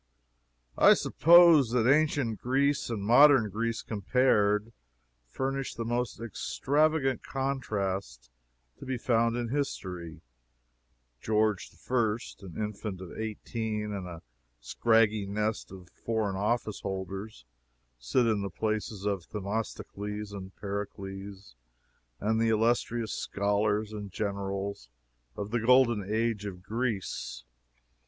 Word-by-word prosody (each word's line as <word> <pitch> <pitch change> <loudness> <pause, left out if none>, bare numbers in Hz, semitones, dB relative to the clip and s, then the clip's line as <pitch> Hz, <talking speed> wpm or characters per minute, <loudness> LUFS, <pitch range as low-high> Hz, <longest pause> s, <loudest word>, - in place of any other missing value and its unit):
I - - +8
suppose 170 -6 +6
that 120 -2 +3
ancient 140 -5 +2
Greece 140 +3 +1
and 110 -4 -3
modern 120 -1 +6
Greece 115 +2 -2
compared, 105 -1 +1 0.5
furnish 135 - -3
the 115 - -4
most 120 +1 -2
extravagant 140 - 0
contrast 100 - -3 0.5
to - - -9
be 130 -1 -1
found 115 -1 +1
in 120 -1 -2
history. 90 - -4 1.0
George 110 -2 +1 0.2
I., 115 -4 +2 0.2
an 95 -4 -11
infant 105 -2 -4
of 90 -2 -9
eighteen, 110 -1 -4
and 95 -3 -5
a 85 -2 -9 0.4
scraggy 110 - +2
nest 105 +1 -2
of 90 -2 -12
foreign 110 -4 -2
office 105 +2 -1
holders, 95 - -5 0.5
sit 60 - +1
in 110 -3 +1
the 100 - -3
places 110 0 -3
of 100 -4 -2
Themistocles, 105 0 -4 0.3
Pericles, 100 - -6 0.6
and 110 +2 +1
the 115 - +3
illustrious 115 0 +1
scholars 105 +1 0
and 105 -2 -6
generals 100 - -4 0.5
of 105 +1 -5
the 120 - +1
Golden 120 -2 +4
Age 110 -2 0
of 90 -2 -8
Greece. 105 - -3
110 Hz, 110 wpm, -29 LUFS, 100-120 Hz, 1.0 s, I